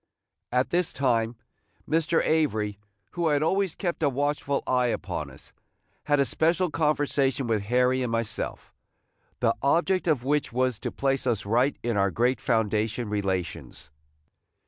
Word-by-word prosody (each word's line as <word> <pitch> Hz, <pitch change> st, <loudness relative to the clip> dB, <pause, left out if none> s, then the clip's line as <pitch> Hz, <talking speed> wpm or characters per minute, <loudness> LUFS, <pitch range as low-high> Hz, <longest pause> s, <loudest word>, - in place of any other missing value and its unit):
At 125 Hz, +1 st, +1 dB
this 175 Hz, 0 st, +1 dB
time, 120 Hz, -3 st, +1 dB, 0.5 s
Mr. 165 Hz, +1 st, +1 dB
Avery, 110 Hz, -11 st, 0 dB, 0.3 s
who 170 Hz, -1 st, -1 dB
had 150 Hz, -1 st, +2 dB
always 190 Hz, +1 st, +1 dB
kept 175 Hz, -4 st, -3 dB
a 145 Hz, -, +3 dB
watchful 140 Hz, +1 st, -1 dB
eye 125 Hz, -1 st, +2 dB
upon 120 Hz, -, -3 dB
us, -, -, -14 dB, 0.5 s
had 145 Hz, -1 st, +2 dB
a 140 Hz, -, +4 dB
special 170 Hz, +4 st, +1 dB
conversation 145 Hz, -3 st, +1 dB
with 110 Hz, -3 st, 0 dB
Harry 125 Hz, +3 st, +2 dB
and 125 Hz, -2 st, -2 dB
myself, 115 Hz, -1 st, -3 dB, 0.7 s
the -, -, +3 dB
object 175 Hz, +6 st, +2 dB
of 145 Hz, -7 st, +2 dB
which 145 Hz, +2 st, 0 dB
was 125 Hz, -1 st, 0 dB
to -, -, -4 dB
place 135 Hz, -1 st, -1 dB
us 110 Hz, -5 st, 0 dB
right 120 Hz, +7 st, +2 dB
in 120 Hz, -2 st, 0 dB
our 100 Hz, 0 st, +3 dB
great 120 Hz, +7 st, +1 dB
foundation 110 Hz, +1 st, 0 dB
relations. 95 Hz, -8 st, -3 dB
130 Hz, 145 wpm, -26 LUFS, 115-150 Hz, 0.7 s, a